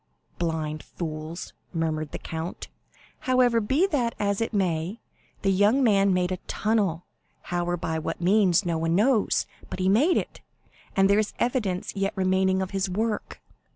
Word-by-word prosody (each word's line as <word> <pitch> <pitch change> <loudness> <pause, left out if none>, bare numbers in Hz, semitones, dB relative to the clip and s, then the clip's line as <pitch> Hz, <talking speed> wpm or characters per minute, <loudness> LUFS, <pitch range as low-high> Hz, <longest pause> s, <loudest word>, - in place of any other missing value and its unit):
"Blind 155 -3 -2
fools!" 160 0 -6 0.2
murmured 155 -2 -1
the - - -4
count. 160 +1 -6 0.6
"However, 245 -2 +4
be 270 - +2
that 255 - 0
as 200 +1 0
it 225 - -1
may, 185 0 -1 0.4
the 195 - +3
young 205 +8 +4
man 200 -4 +4
made 180 0 +1
a 185 - -1
tunnel, 200 -6 0 0.5
how 175 0 0
or 175 0 -1
by 160 -1 -2
what 165 +1 -4
means 185 0 +3
no 170 -2 0
one 165 +1 +1
knows; 220 +2 +3 0.2
but - - -5
he 185 0 0
made 280 - +4
it, - - -4 0.5
and 195 0 +5
there 200 +1 +4
is 215 - -1
the - - -1
evidence 215 -9 -1
yet 195 0 -1
remaining 190 0 +2
of 190 - -6
his 195 -1 -1
work. 215 +3 -3
190 Hz, 170 wpm, -26 LUFS, 170-215 Hz, 0.6 s, and